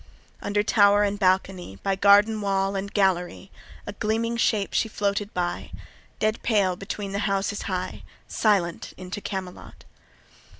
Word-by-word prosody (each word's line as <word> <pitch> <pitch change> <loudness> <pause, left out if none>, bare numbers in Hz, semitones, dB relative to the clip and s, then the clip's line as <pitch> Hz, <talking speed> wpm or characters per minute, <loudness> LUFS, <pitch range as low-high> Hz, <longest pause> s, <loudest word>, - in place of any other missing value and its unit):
Under 205 0 0
tower 205 -1 +4
and 205 0 -1
balcony, 185 - 0
By 195 - +1
garden 205 +2 +5
wall 195 0 0
and 200 +1 -3
gallery, 190 -1 0 0.3
A 205 - -6
gleaming 225 +3 -1
shape 215 -3 +1
she 225 - +1
floated 205 0 -1
by, 175 -1 -3 0.5
A 215 0 +2
corse 205 -5 +1
between 195 0 -5
the 200 - -2
houses 195 +1 -1
high, 185 0 -3 0.3
Silent 195 -6 0
into 185 +2 -7
Camelot. 190 -3 -7
200 Hz, 135 wpm, -25 LUFS, 190-210 Hz, 0.5 s, garden